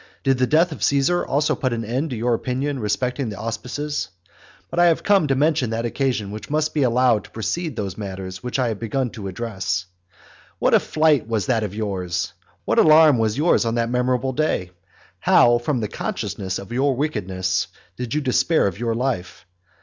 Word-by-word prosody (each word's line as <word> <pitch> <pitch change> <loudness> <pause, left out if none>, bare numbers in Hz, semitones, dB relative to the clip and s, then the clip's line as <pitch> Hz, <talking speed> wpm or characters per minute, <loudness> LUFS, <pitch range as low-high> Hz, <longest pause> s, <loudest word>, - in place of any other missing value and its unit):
Did 135 -2 +2
the 125 - +3
death 165 +5 +3
of 150 - -8
Caesar 140 +6 +2
also 145 +2 +1
put 130 -2 -1
an 115 -1 -3
end 130 +8 -2
to 125 - -4
your 120 +2 0
opinion 130 +4 -2
respecting 125 +4 -1
the 105 - -7
auspices? 125 +7 -4 0.6
But 170 - -1
I 175 - +6
have 165 - +2
come 195 -6 +4
to 135 - +2
mention 145 -2 +2
that 115 +1 -2
occasion 120 -5 -1
which 105 +1 -8
must 155 +1 0
be 150 - +1
allowed 125 -4 +3
to - - -14
precede 155 +7 -3
those 100 -2 -4
matters 95 -2 -6
which 125 +1 -3
I 125 -3 +1
had 110 -3 -4
begun 125 +2 -2
to 100 -3 -6
discuss. 95 -4 -3 0.7
What - - +2
a - - +7
flight 155 -7 +2
was 110 -4 -1
that 115 -3 +1
of 105 -2 -4
yours! 95 -5 -2 0.3
What - - +2
alarm 155 -4 +6
was 110 +1 0
yours 155 0 +3
on 115 0 -1
that 115 0 0
memorable 125 +1 0
day! 125 -11 -1 0.5
How, 120 0 +5
from 125 0 -1
the 105 - -1
consciousness 95 -1 -4
of 100 +3 -9
your 135 +2 +1
wickedness, 95 - -1 0.3
did 125 +3 -4
you 150 - +1
despair 145 +4 +2
of 100 0 -2
your 115 -1 -1
life! 115 -9 -3
125 Hz, 195 wpm, -22 LUFS, 105-140 Hz, 0.7 s, a